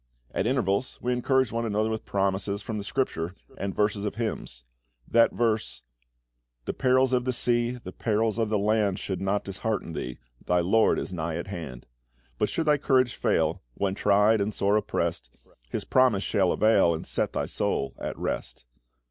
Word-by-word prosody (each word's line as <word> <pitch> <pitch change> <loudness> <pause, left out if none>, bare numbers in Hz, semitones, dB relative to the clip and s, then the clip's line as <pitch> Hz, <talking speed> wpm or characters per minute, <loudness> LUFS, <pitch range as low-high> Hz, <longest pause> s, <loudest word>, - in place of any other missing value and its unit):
At 105 - 0
intervals 125 -2 0
we 125 +1 0
encouraged 130 0 +2
one 115 +1 -1
another 110 0 0
with 110 - -4
promises 100 +1 0
from 110 -1 -4
the - - -5
Scripture 95 -7 -2 0.2
and 100 -1 -3
verses 105 -1 +1
of 105 - -3
hymns. 110 - -4 0.4
That 115 0 +4
verse 110 -2 -1 0.8
"The - - -2
perils 130 0 +3
of 125 -1 +2
the 130 - 0
sea, 120 0 +1
the 115 -7 -8
perils 110 +1 0
of 110 -2 +1
the 105 - +2
land, 105 -1 +1
Should 95 -2 -4
not 100 +1 0
dishearten 100 -2 -3
thee: 65 -4 -5 0.3
thy 90 0 +2
LORD 110 +6 +3
is - - -4
nigh 80 -2 -3
at - - -4
hand. 80 -10 -7 0.5
But - - +2
should 165 - -1
thy 150 -1 +3
courage 130 -3 +3
fail, 80 +3 +1
when 100 -1 0
tried 105 +2 +3
and 105 +1 -1
sore 100 +1 +2
oppressed, 105 - -1 0.4
His - - -3
promise 125 -7 +3
shall 95 -4 +2
avail, 110 -6 +4
and 80 - -6
set - - -1
thy - - -1
soul 70 - -1
at - - -4
rest." - - -4
105 Hz, 180 wpm, -27 LUFS, 95-120 Hz, 0.8 s, That